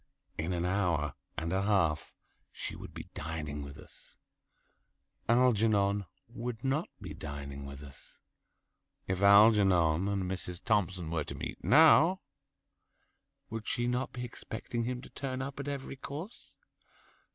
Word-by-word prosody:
In 80 +3 -2
an 85 -1 -1
hour 90 -6 +1 0.2
and 80 +3 -2
a 95 - +2
half 90 -7 +1 0.4
she - - -6
would - - -9
be - - -9
dining 75 -2 -4
with 70 +1 -8
us. - - -16 1.1
Algernon 105 -5 +3 0.2
would 120 0 -6
not 135 +5 0
be - - -7
dining 70 -2 -6
with 70 +1 -9
us. 70 +1 -14 0.9
If 95 0 -2
Algernon 100 -5 +6
and 100 -1 0
Mrs. 90 -1 -4
Thompson 90 -4 +1
were 80 -2 0
to - - -6
meet - - -6
now, 160 +5 +7 1.3
would 110 -1 -5
she 120 - 0
not 125 +2 -1
be 125 -1 -5
expecting 115 0 -5
him 125 +1 -3
to - - -11
turn 130 -2 -4
up 140 +1 -5
at 140 - -4
every 135 -1 -4
course? 155 - -8
100 Hz, 140 wpm, -31 LUFS, 80-125 Hz, 1.3 s, now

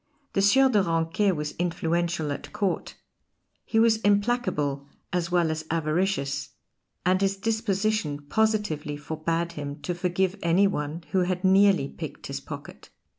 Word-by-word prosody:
The 195 - +2
Sieur 265 +7 +6
de 215 -6 +3
Ranquet 165 +3 +1
was 150 -1 -3
influential 170 -2 0
at 140 - -6
Court; 200 -4 -2 0.7
he 225 - -2
was 225 0 +5
implacable 200 - +1 0.3
as 175 -1 0
well 175 -2 +2
as 160 0 -3
avaricious, 155 -3 -1 0.5
and 185 +1 +3
his 195 0 +1
disposition 215 -7 0
positively 205 -5 0
forbade 160 +3 -2
him 145 -2 -6
to 175 - -1
forgive 180 +2 -1
any 170 +4 +4
one 160 -3 -2
who 190 - +2
had 180 0 0
nearly 190 -5 +5
picked - - -8
his - - -4
pocket. - - -10
175 Hz, 140 wpm, -26 LUFS, 155-200 Hz, 0.7 s, Sieur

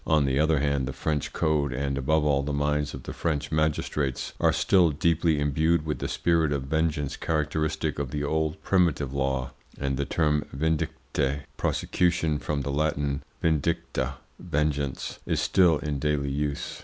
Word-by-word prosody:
On 75 -3 +4
the 70 0 +1
other 80 -1 +3
hand, 70 -2 0
the 70 - -4
French 75 +2 -2
code, 75 -3 +1
and 70 +2 -1
above 75 +3 +1
all 70 -2 +3
the 70 +1 -3
minds 75 0 0
of 65 - -9
the - - -6
French 75 -3 -2
magistrates, 75 -3 -1
are - - +4
still 90 -4 +4
deeply 80 +1 +2
imbued 80 +3 +2
with 75 - -2
the - - -2
spirit 80 -3 +1
of 70 -2 -1
vengeance 80 0 -1
characteristic 80 -1 -1
of 70 -3 -2
the 75 +1 -3
old 80 +1 0
primitive 85 -8 +2
law, 65 -2 -1 0.3
and 70 -1 -1
the 70 - -1
term 75 -2 +1
"vindicte" 70 -2 -1
(prosecution, 85 -4 +1
from 75 -1 -2
the 70 - -3
Latin 70 -1 0 0.2
vindicta, 75 -4 0 0.2
vengeance) 75 -4 -2
is - - +1
still 85 -4 +4
in 75 -1 -3
daily 70 -1 0
use. 70 0 -3
75 Hz, 165 wpm, -27 LUFS, 70-80 Hz, 0.3 s, On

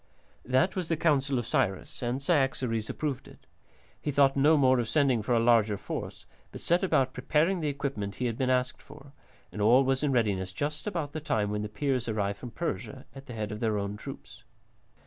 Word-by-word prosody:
That 130 +10 +2
was 185 -3 -2
the 165 - +1
counsel 140 -4 +2
of 120 - -2
Cyrus, 130 +6 -1
and 120 +2 -1
Cyaxares 130 -7 0
approved 145 -4 -3
it. - - -17 0.6
He - - -3
thought 140 -1 +4
no 150 +3 +5
more 130 -2 +4
of 115 -2 -2
sending 130 -3 +2
for 120 +3 0
a - - +4
larger 115 -3 +3
force, - - -6 0.3
but - - -8
set 175 +3 +1
about 135 -8 +2
preparing 155 +8 +1
the 155 - -2
equipment 135 -8 -3
he 125 - -3
had 115 -2 -1
been 130 +1 -1
asked 130 0 0
for, 140 -1 -15 0.4
and 105 - -5
all 120 +6 +6
was 135 0 +1
in 150 -2 +1
readiness 100 -7 0
just 150 - -3
about 165 -8 -2
the 155 - -4
time 105 -7 0
when 105 0 -2
the 105 - -4
Peers 125 +2 -1
arrived 100 -2 -1
from 125 - -7
Persia 135 0 -5
at 135 0 -12
the 125 - -7
head 110 -1 -3
of 105 - -5
their 110 -2 0
own 100 0 -3
troops. 115 -1 -10
130 Hz, 210 wpm, -29 LUFS, 110-145 Hz, 0.6 s, all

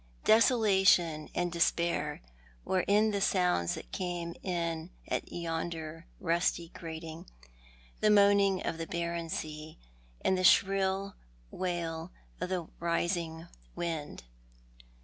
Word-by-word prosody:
Desolation 195 -9 +4
and 175 0 0
despair 170 -3 0 0.4
were 190 - +1
in 210 +2 +4
the 200 -1 -1
sounds 180 - +2
that - - -10
came 175 -2 -3
in 170 -2 -2 0.2
at - - -3
yonder 165 -1 -4
rusty 170 0 0
grating, 160 -1 -8 0.7
the 215 - +3
moaning 200 -2 +4
of 165 - -2
the 165 - -4
barren 170 -1 -3
sea, 155 0 -5 0.5
and 190 - +4
the 185 - -1
shrill 195 +1 +3 0.4
wail 170 -2 -3 0.3
of 180 - -3
the 180 -3 -2
rising 170 -1 -1 0.3
wind. 165 -4 -4
170 Hz, 110 wpm, -31 LUFS, 165-190 Hz, 0.7 s, Desolation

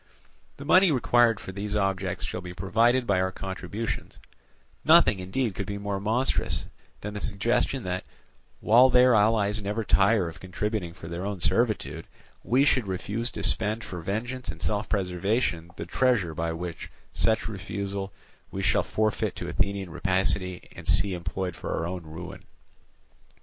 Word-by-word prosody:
The 140 - -8
money 185 +2 +6
required 120 -3 +3
for - - -7
these 100 +2 -4
objects 95 -2 -1
shall 90 - -4
be 90 -1 -8
provided 120 +7 +2
by 100 -4 +2
our 95 0 0
contributions: 100 +4 -5 0.7
nothing 95 - +6
indeed 105 +5 -1
could 100 0 -4
be 100 - -3
more 100 -1 -3
monstrous 115 +6 0 0.4
than 105 0 -5
the 105 - -5
suggestion 120 +5 0
that, 90 0 -3 0.6
while 125 +4 +6
their 125 0 +6
allies 105 -1 +3
never 105 +3 -2
tire 100 -2 +3
of 80 - -8
contributing 95 -1 -3
for 80 - -10
their 85 +2 -4
own 100 -1 -3
servitude, 90 -3 0 0.4
we 130 +4 +3
should 130 -7 +2
refuse 105 +5 -2
to - - -5
spend 110 +1 0
for 90 -2 -6
vengeance 120 +6 -3
and 85 +1 -5
self 105 +7 -1
preservation 90 -2 0
the - - -5
treasure 110 -5 +1
which 85 +2 -4
by - - -28 0.2
such 110 -1 +1
refusal 100 -1 -4 0.4
we - - -4
shall - - +3
forfeit 110 -1 -1
to - - -5
Athenian 100 -2 -1
rapacity 95 0 -1
and - - -9
see 100 -2 +3
employed 90 +1 -3
for - - -4
our 80 - -1
own 90 +1 -4
ruin. 90 +4 -8
100 Hz, 160 wpm, -27 LUFS, 90-110 Hz, 0.7 s, money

